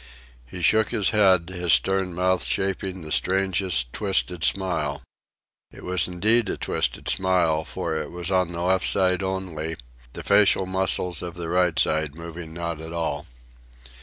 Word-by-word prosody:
He 90 Hz, +7 st, -8 dB
shook 110 Hz, +4 st, +3 dB
his 110 Hz, -5 st, +1 dB
head, 95 Hz, -5 st, +4 dB
his 90 Hz, -2 st, 0 dB
stern 95 Hz, -2 st, +1 dB
mouth 90 Hz, +1 st, +1 dB
shaping 95 Hz, -2 st, -2 dB
the 75 Hz, -, -9 dB
strangest, 95 Hz, -10 st, 0 dB
twisted 95 Hz, -4 st, -1 dB
smile. 80 Hz, -8 st, -1 dB, 0.7 s
It -, -, -13 dB
was 90 Hz, 0 st, +1 dB
indeed 105 Hz, +5 st, +2 dB
a -, -, -3 dB
twisted -, -, -2 dB
smile, 90 Hz, -4 st, +2 dB
for 80 Hz, -2 st, -4 dB
it 75 Hz, -1 st, -3 dB
was 90 Hz, +1 st, -5 dB
on 90 Hz, -2 st, +1 dB
the 85 Hz, 0 st, -4 dB
left 95 Hz, +1 st, +2 dB
side 95 Hz, -1 st, +2 dB
only, 90 Hz, -5 st, -3 dB, 0.4 s
the -, -, -7 dB
facial 100 Hz, -1 st, +4 dB
muscles 95 Hz, -3 st, 0 dB
of 90 Hz, -1 st, -6 dB
the 85 Hz, -1 st, -5 dB
right 90 Hz, -2 st, +1 dB
side 80 Hz, -2 st, +1 dB
moving 85 Hz, 0 st, -8 dB
not 85 Hz, -1 st, -5 dB
at 80 Hz, +1 st, -8 dB
all. 80 Hz, -4 st, -3 dB
90 Hz, 160 wpm, -24 LUFS, 80-95 Hz, 0.7 s, head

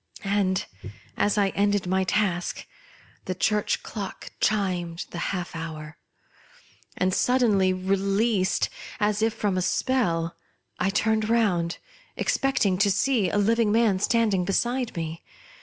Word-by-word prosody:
and, 195 Hz, -2 st, +1 dB, 0.5 s
as 205 Hz, +1 st, +1 dB
I 200 Hz, -1 st, +3 dB
ended 205 Hz, -1 st, +1 dB
my 190 Hz, +1 st, +1 dB
task, 185 Hz, -3 st, -1 dB, 0.6 s
the 185 Hz, -, -3 dB
church 210 Hz, +3 st, 0 dB
clock 200 Hz, -4 st, -7 dB
chimed 180 Hz, -5 st, 0 dB
the 170 Hz, -, -5 dB
half 180 Hz, -3 st, -4 dB
hour; 155 Hz, -2 st, -7 dB, 1.0 s
and, 185 Hz, 0 st, +1 dB
suddenly 215 Hz, -7 st, +3 dB
released, 195 Hz, +2 st, +1 dB, 0.3 s
as 210 Hz, 0 st, +1 dB
if 225 Hz, +1 st, +3 dB
from 200 Hz, -4 st, -1 dB
a -, -, 0 dB
spell, 170 Hz, -7 st, 0 dB, 0.4 s
I 185 Hz, -, +1 dB
turned 220 Hz, +1 st, +1 dB
round, 185 Hz, -8 st, +1 dB, 0.4 s
expecting 240 Hz, -9 st, +1 dB
to 205 Hz, 0 st, +4 dB
see 205 Hz, 0 st, +2 dB
a 205 Hz, -, -1 dB
living 220 Hz, +1 st, +2 dB
man 220 Hz, -4 st, +3 dB
standing 210 Hz, -3 st, +2 dB
beside 240 Hz, +4 st, -1 dB
me. 165 Hz, 0 st, -4 dB
195 Hz, 125 wpm, -25 LUFS, 185-220 Hz, 1.0 s, to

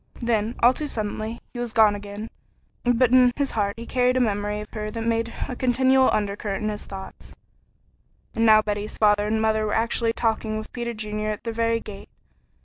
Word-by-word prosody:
Then, 230 Hz, -1 st, 0 dB
all 245 Hz, +2 st, +7 dB
too 300 Hz, +3 st, -4 dB
suddenly, 220 Hz, -1 st, -4 dB
he 240 Hz, -, -6 dB
was 240 Hz, -2 st, -4 dB
gone 220 Hz, -2 st, +5 dB
again, 205 Hz, +2 st, -7 dB, 0.5 s
but 245 Hz, 0 st, +3 dB
in 250 Hz, -1 st, +6 dB
his 280 Hz, -2 st, -1 dB
heart 200 Hz, -1 st, -1 dB
he 230 Hz, -, -7 dB
carried 250 Hz, +1 st, +1 dB
a -, -, +3 dB
memory 210 Hz, -3 st, 0 dB
of 210 Hz, -, -9 dB
her 215 Hz, -1 st, -4 dB
that 225 Hz, +1 st, -5 dB
made 230 Hz, 0 st, 0 dB, 0.2 s
a 250 Hz, -, -5 dB
continual 260 Hz, +1 st, +3 dB
undercurrent 205 Hz, 0 st, -2 dB
in 215 Hz, -, 0 dB
his 210 Hz, -, -6 dB
thoughts. 190 Hz, -1 st, -10 dB, 1.0 s
And 225 Hz, -, 0 dB
now 215 Hz, -1 st, +6 dB
Betty's 210 Hz, 0 st, -3 dB
father 210 Hz, -1 st, +3 dB
and 220 Hz, +1 st, 0 dB
mother 220 Hz, 0 st, +1 dB
were 210 Hz, -, -1 dB
actually 230 Hz, 0 st, +1 dB
talking 220 Hz, -2 st, -1 dB
with 215 Hz, -, -8 dB
Peter 235 Hz, -1 st, -4 dB
Junior 215 Hz, 0 st, -3 dB
at 210 Hz, -, -4 dB
their 230 Hz, -, -3 dB
very 230 Hz, 0 st, +1 dB
gate. 200 Hz, -3 st, -10 dB
220 Hz, 200 wpm, -24 LUFS, 210-235 Hz, 1.0 s, all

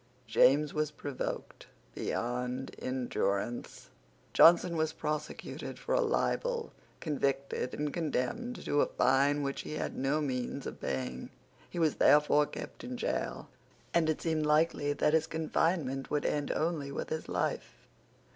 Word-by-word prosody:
James 140 Hz, +6 st, +4 dB
was 155 Hz, -1 st, 0 dB
provoked 145 Hz, -2 st, -5 dB, 0.3 s
beyond 125 Hz, +2 st, -3 dB
endurance. 120 Hz, -3 st, -2 dB, 0.4 s
Johnson 170 Hz, +1 st, +7 dB
was 160 Hz, -1 st, 0 dB
prosecuted 150 Hz, -1 st, -4 dB
for -, -, -3 dB
a -, -, +4 dB
libel, 475 Hz, +1 st, 0 dB, 0.3 s
convicted, 140 Hz, -4 st, -1 dB
and 150 Hz, -1 st, -2 dB
condemned 175 Hz, -, -2 dB
to 145 Hz, -, +2 dB
a -, -, +3 dB
fine 140 Hz, +2 st, +3 dB
which 140 Hz, 0 st, -2 dB
he -, -, -7 dB
had 155 Hz, -, -3 dB
no 135 Hz, +3 st, +1 dB
means 135 Hz, -1 st, -2 dB
of -, -, -7 dB
paying. 65 Hz, -1 st, -3 dB, 0.4 s
He -, -, -8 dB
was 160 Hz, -3 st, +2 dB
therefore 150 Hz, 0 st, +5 dB
kept -, -, -8 dB
in 250 Hz, 0 st, -5 dB
gaol; 245 Hz, -, -2 dB, 0.5 s
and 165 Hz, -2 st, +3 dB
it 155 Hz, -, 0 dB
seemed 160 Hz, -2 st, 0 dB
likely 150 Hz, -1 st, +2 dB
that 150 Hz, +1 st, +1 dB
his 160 Hz, 0 st, +3 dB
confinement 160 Hz, -3 st, 0 dB
would 150 Hz, -1 st, 0 dB
end 145 Hz, -1 st, 0 dB
only 155 Hz, -3 st, -1 dB
with -, -, -4 dB
his 160 Hz, 0 st, -3 dB
life. -, -, -3 dB
150 Hz, 140 wpm, -31 LUFS, 135-160 Hz, 0.5 s, Johnson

